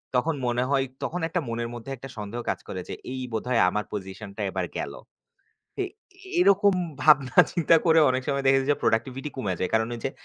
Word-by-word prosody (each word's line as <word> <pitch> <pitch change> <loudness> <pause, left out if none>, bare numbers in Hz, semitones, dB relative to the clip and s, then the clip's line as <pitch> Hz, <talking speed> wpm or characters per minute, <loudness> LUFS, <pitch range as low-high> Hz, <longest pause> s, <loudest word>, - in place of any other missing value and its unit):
তখন 155 +6 +2
মনে 120 +1 +1
হয়, 135 -1 +2 0.2
তখন 175 +1 -2
একটা 175 +2 -1
মনের 115 0 -3
মধ্যে 120 +3 -7
একটা 135 +3 -9
সন্দেহ 105 +3 -5
কাজ - - -1
করে 95 - -5
যে, - - -3 0.2
এই 130 - -4
বোধহয় 115 +2 +1
আমার 105 +3 -2
পজিশনটা 100 +1 -7
এবার 95 -1 -2
গেলো। - - -5 0.8
এ - - 0 0.6
এরকম 200 - +5 0.3
ভাবনা 150 -4 +4
চিন্তা 165 -1 +4
করে 165 -2 +5
অনেক 130 0 0
সময় 140 -1 0
দেখেছি 135 0 +4
যে, 145 - +3
প্রোডাক্টিভিটি 130 +6 0
কমে 105 -8 -1
যায়। 95 - -1
কারণ, 110 0 +3
ওইযে 120 +3 -3
130 Hz, 185 wpm, -26 LUFS, 110-145 Hz, 0.8 s, এরকম